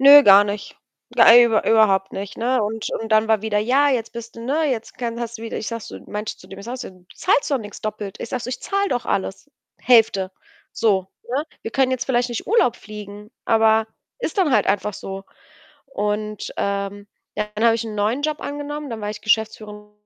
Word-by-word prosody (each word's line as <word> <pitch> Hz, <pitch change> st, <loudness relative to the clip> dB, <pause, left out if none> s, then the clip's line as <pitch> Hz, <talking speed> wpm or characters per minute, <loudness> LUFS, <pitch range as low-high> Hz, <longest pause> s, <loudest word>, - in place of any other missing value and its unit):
Nö, 285 Hz, +1 st, +10 dB
gar 200 Hz, -2 st, +8 dB
nicht. 205 Hz, 0 st, -5 dB, 0.4 s
Ja, -, -, +8 dB
über 235 Hz, -2 st, +5 dB
überhaupt 200 Hz, -4 st, +3 dB
nicht, 195 Hz, 0 st, -6 dB
ne, 245 Hz, +1 st, +1 dB
und 215 Hz, +1 st, -3 dB
und 225 Hz, -, -5 dB
dann 215 Hz, 0 st, +4 dB
war 220 Hz, -2 st, +2 dB
wieder: 220 Hz, -1 st, 0 dB
„Ja, 260 Hz, +7 st, +3 dB
jetzt 235 Hz, -4 st, -1 dB
bist 235 Hz, 0 st, -9 dB
du, -, -, -8 dB
ne 295 Hz, +4 st, +1 dB
jetzt 230 Hz, -3 st, -4 dB
kann 235 Hz, -2 st, -4 dB
hast 235 Hz, -1 st, -5 dB
du -, -, -10 dB
wieder“, 230 Hz, -, -5 dB
ich -, -, -5 dB
sage 230 Hz, -1 st, -4 dB
so -, -, -9 dB
meinte 210 Hz, +1 st, -5 dB
zu -, -, -16 dB
dem 195 Hz, +1 st, -11 dB
ich 200 Hz, -, -10 dB
sage 245 Hz, +2 st, -4 dB
so: 250 Hz, -, -7 dB
„Du 185 Hz, -1 st, -21 dB
zahlst 285 Hz, -, +1 dB
doch 275 Hz, -, +2 dB
nix 210 Hz, -3 st, -9 dB
doppelt.“ 210 Hz, -2 st, -5 dB
Ich -, -, -5 dB
sage 250 Hz, 0 st, -3 dB
so: -, -, -5 dB
„Ich 250 Hz, -, -5 dB
zahle 395 Hz, 0 st, 0 dB
doch 245 Hz, -1 st, -1 dB
alles 195 Hz, +8 st, -3 dB, 0.3 s
Hälfte.“ 220 Hz, -6 st, +4 dB, 0.4 s
So, 195 Hz, -4 st, +1 dB, 0.2 s
ne? 270 Hz, +5 st, -1 dB, 0.2 s
Wir 225 Hz, -, -5 dB
können 265 Hz, -1 st, +2 dB
jetzt 255 Hz, -1 st, -1 dB
vielleicht 245 Hz, -1 st, +1 dB
nicht 240 Hz, -2 st, -5 dB
Urlaub 400 Hz, -, +3 dB
fliegen, 210 Hz, 0 st, -10 dB
aber 220 Hz, 0 st, +3 dB, 0.3 s
ist -, -, -3 dB
dann 345 Hz, -7 st, +3 dB
halt -, -, +3 dB
einfach 205 Hz, +1 st, 0 dB
so 195 Hz, 0 st, -7 dB, 0.6 s
und, 210 Hz, -4 st, -3 dB
ähm, 200 Hz, 0 st, -3 dB, 0.3 s
ja, 210 Hz, -, -1 dB
dann 215 Hz, -, -1 dB
habe 230 Hz, -1 st, +6 dB
ich 230 Hz, -, -4 dB
'n 220 Hz, -, -6 dB
neuen 220 Hz, +7 st, 0 dB
Job 305 Hz, 0 st, -1 dB
angenommen. 290 Hz, 0 st, -5 dB
Dann 225 Hz, -1 st, -5 dB
war 210 Hz, 0 st, -3 dB
ich 210 Hz, -, -8 dB
geschäftsführende 215 Hz, -1 st, -1 dB
220 Hz, 220 wpm, -21 LUFS, 210-250 Hz, 0.6 s, Nö